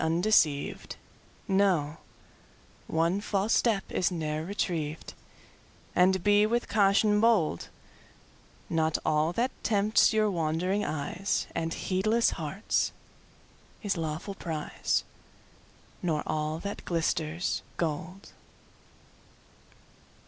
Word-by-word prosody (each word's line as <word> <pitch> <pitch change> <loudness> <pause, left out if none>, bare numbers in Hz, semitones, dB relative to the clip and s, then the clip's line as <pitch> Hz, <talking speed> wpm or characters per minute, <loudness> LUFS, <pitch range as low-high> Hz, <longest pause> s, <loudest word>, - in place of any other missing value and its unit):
undeceivedKnow 165 0 0 0.9
one 165 +5 +1
false 205 +1 0
step 215 -5 +2
is 180 - +1
ne'er 155 -2 -2
retrieved, 165 -5 -3 0.8
And 185 0 +4
be 205 0 +5
with 235 +2 0
caution 210 0 +3
bold:Not 165 - -2
all 155 +1 +2
that 245 +6 0
tempts 210 0 +3
your 215 -1 +2
wandering 175 +4 0
eyesAnd 165 +1 -2
heedless 215 +5 +1
hearts, 165 +7 -1 0.9
is 200 -2 0
lawful 160 +4 -4
prize, 160 -5 -2 1.0
Nor 160 -4 0
all 155 0 -1
that 200 +4 -6
glisters, 165 0 -1 0.2
gold! 170 +4 -4
180 Hz, 85 wpm, -29 LUFS, 160-205 Hz, 1.0 s, be